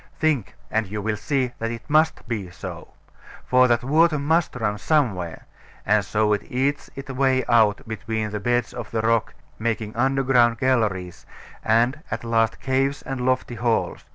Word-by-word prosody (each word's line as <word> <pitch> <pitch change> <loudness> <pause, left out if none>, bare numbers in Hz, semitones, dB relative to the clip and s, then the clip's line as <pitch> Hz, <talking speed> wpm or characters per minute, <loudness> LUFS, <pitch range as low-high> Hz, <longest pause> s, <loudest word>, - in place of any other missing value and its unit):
Think: 145 -11 0 0.2
and 110 -2 0
you 105 +2 -4
will 105 +1 -1
see 130 +2 -1
that 115 - -2
it 115 -1 -7
must 155 +1 +2
be 105 -6 -3
so. 90 - -8 0.6
For 130 0 +5
that 120 -1 +2
water 155 +4 +3
must 160 +3 +1
run 105 -4 -2
somewhere; 105 - 0 0.4
and - - +3
so 105 0 +1
it 100 - 0
eats 135 +3 -1
its 135 0 -7
way 130 -1 +1
out 110 -4 +3
between 110 0 -3
the 105 - -3
beds 120 +3 0
of 120 -4 -6
the 110 - -1
rock, 115 0 +1 0.2
making 110 -1 -2
underground 125 -2 +3
galleries, 105 -9 -1 0.4
and 120 +6 +2
at 110 - -4
last 115 -1 +1
caves 135 +2 0
and 135 -1 -4
lofty 130 -1 0
halls. 115 0 -1
120 Hz, 165 wpm, -23 LUFS, 110-135 Hz, 0.6 s, For